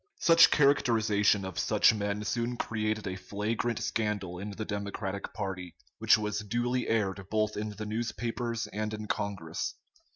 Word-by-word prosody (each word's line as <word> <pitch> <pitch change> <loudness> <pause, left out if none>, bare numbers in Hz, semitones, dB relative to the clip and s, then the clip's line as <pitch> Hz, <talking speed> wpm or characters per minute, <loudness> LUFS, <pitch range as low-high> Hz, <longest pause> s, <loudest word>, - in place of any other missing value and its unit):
Such 165 -1 +7
characterization 110 -8 +3
of 95 -3 -5
such - - +4
men 105 0 -2
soon 120 +3 -1
created 110 -1 -2
a 95 - -3
flagrant 105 +5 -2
scandal 100 -5 -2
in 100 +2 -5
the 105 +1 -5
Democratic 100 -1 -4
party, 95 -4 -5 0.2
which 110 +1 +6
was 105 -1 -2
duly 120 +4 -1
aired 95 -4 0
both 110 0 0
in 105 +1 -3
the 105 +1 -6
newspapers 115 +1 -2
and 105 +1 -3
in 110 0 -6
Congress. 95 -6 -3
105 Hz, 150 wpm, -30 LUFS, 100-115 Hz, 0.2 s, Such